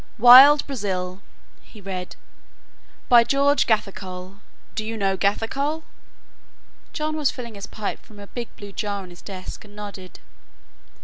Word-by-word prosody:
"'Wild 260 +5 +9
Brazil'," 190 -7 -4 0.4
he 215 - -16
read, 185 -2 -6 0.9
"by 240 -1 +7
George 280 +4 +2
Gathercole 190 -3 -3 0.4
do 220 - -3
you 225 +1 -5
know 195 -2 0
Gathercole?" 270 +11 -1 1.1
John 310 0 -3
was 300 -3 +1
filling 235 -3 -7
his 200 0 -8
pipe 210 -2 -5
from 215 - -17
a 205 - -9
big 235 +3 -7
blue 205 -1 -10
jar 200 -1 -4
on 180 - -12
his 175 - -14
desk 185 -2 -8
and 205 -1 -16
nodded. 200 -3 -9
210 Hz, 140 wpm, -23 LUFS, 195-245 Hz, 1.1 s, Wild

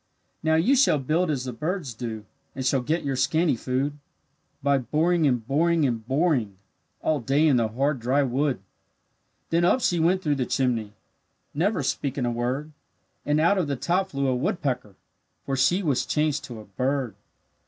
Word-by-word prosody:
"Now, 160 0 +2
you 210 +13 +4
shall 265 - +4
build 155 +6 0
as 140 -4 -1
the 125 - -4
birds 155 +1 -3
do, 110 -2 -6 0.3
And 130 -1 -4
shall 135 0 +2
get 155 +7 -1
your 140 -2 -1
scanty 155 +3 +2
food 135 +5 -2 0.6
By 140 -1 +3
boring, 155 +6 +1
and 125 -4 0
boring, 160 +4 +2
and 115 -4 -1
boring, 130 - +1 0.5
All 155 -2 +1
day 135 +6 +2
in 140 -4 +4
the 115 -2 +2
hard 135 +5 -1
dry 130 +5 +2
wood." 135 -2 0 0.9
Then 170 +1 +2
up 180 +9 +4
she 175 -8 +1
went 180 +3 +2
through 145 -2 +1
the 125 - -1
chimney, 115 -5 0 0.6
Never 170 +1 0
speaking 135 0 -2
a 120 - 0
word, 125 +6 -2 0.6
And 150 +1 +2
out 170 +5 +3
of 170 - 0
the 140 - -1
top 185 +8 0
flew 140 -3 -2
a 130 -1 +1
woodpecker, 130 - -2 0.5
For 135 - -1
she 175 +9 +2
was 145 -6 0
changed 150 -3 0
to 120 -4 -8
a 105 - -11
bird. 130 +3 -2
140 Hz, 180 wpm, -25 LUFS, 125-160 Hz, 0.9 s, you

